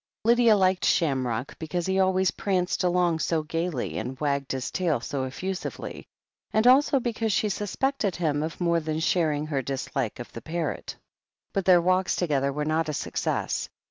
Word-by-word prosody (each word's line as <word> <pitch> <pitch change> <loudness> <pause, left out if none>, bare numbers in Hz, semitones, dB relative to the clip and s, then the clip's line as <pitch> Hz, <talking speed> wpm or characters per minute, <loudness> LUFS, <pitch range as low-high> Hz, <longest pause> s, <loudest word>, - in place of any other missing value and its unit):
Lydia 235 -1 +5
liked 185 -1 +2
Shamrock 130 -6 0
because 170 +2 -3
he 190 0 0
alwa3rs 190 -1 +2
pranced 185 -2 0
along 175 -2 +2
so 160 -1 0
gaily, 165 -3 -2
and 130 +1 -5
wagged 140 -2 -1
his 130 -1 -3
tail 170 -8 0
so 130 +3 -3
effusively, 185 +8 -5 0.4
and 220 +1 +2
also 275 +2 +5
because 230 -2 -1
she 210 +2 +1
suspected 210 +1 -1
him 150 -4 0
of 160 +1 -4
more 170 -1 +2
than 155 0 -3
sharing 155 -3 +1
her 145 -3 -1
dislike 135 -2 -3
of 120 - -9
the 115 - -7
parrot. 160 +2 -4 0.6
But 195 -2 -1
their 180 -2 +6
walks 185 +1 +2
together 140 -5 +1
were 150 +2 -2
not 155 +1 0
a - - -2
success. - - -2
170 Hz, 170 wpm, -26 LUFS, 145-190 Hz, 0.6 s, their